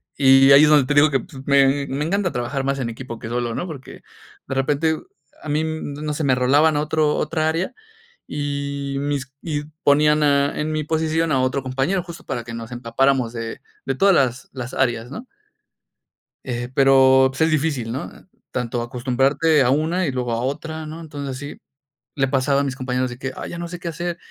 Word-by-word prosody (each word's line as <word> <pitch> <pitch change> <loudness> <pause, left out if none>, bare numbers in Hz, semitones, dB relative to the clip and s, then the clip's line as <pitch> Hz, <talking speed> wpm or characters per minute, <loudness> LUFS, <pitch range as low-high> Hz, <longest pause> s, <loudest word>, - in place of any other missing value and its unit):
y 135 0 +6
ahí 140 +2 +9
es - - +3
donde 150 -3 +5
te 145 - 0
digo 145 +1 +6
que, 135 -2 +1
pues, 150 -8 -11
me 140 0 +3
me 140 +3 -2
encanta 190 +1 0
trabajar 125 +3 -3
más 135 0 -1
en 125 -4 -2
equipo 115 0 -8
que 110 - -8
solo, 120 0 -2
¿no? - - -3
Porque 150 -7 -10 0.4
de - - -3
repente 145 +4 +1 0.5
a 155 - -7
mí, 150 +2 +1
no 155 -1 -4
sé, 155 - -3
me 135 -3 +3
rolaban 145 +5 +3
otro 150 0 +1
otra 160 -1 0
área, 165 +4 -2 0.5
y 140 -1 -3
mis 140 -2 -2
y 150 -3 -3 0.2
ponían 150 +1 +4
a 140 -1 +2
en 155 +1 -2
mi 155 0 -1
posición 160 +1 0
a 135 -3 +2
otro 130 +1 0
compañero, 135 +9 -1
justo 170 -1 -11
para 120 - -4
que 115 0 -8
nos 115 +1 -7
empapáramos 120 +1 0
de 115 -1 -5 0.2
de 135 - -1
todas 195 +8 +4
las 130 -4 +1
las 130 -1 -6
áreas, 120 -2 0
¿no? 240 - -8 1.2
Eh, 120 -1 -4
pero, 130 -1 +6
pues 135 - -6
es 160 +1 +3
difícil, 145 -7 0
¿no? 135 +7 -5 0.4
Tanto 120 -1 -2
acostumbrarte 135 +6 +1
a 125 - +2
una 160 +7 +1
y 140 - -1
luego 125 -2 -2
a 115 - -1
otra, 155 +4 -4
¿no? 155 +2 -8
Entonces, 145 -4 -6
así - - -12 0.6
le 135 -1 +1
pasaba 140 +1 +2
a - - -1
mis 135 -2 -3
compañeros 130 0 -1
de 120 - -8
que: 130 0 -5
"Ay, - - -6
ya 170 - -6
no 170 - -4
sé 175 +1 -7
qué 175 -1 -5
hacer". 175 +1 -4
140 Hz, 205 wpm, -21 LUFS, 130-155 Hz, 1.2 s, ahí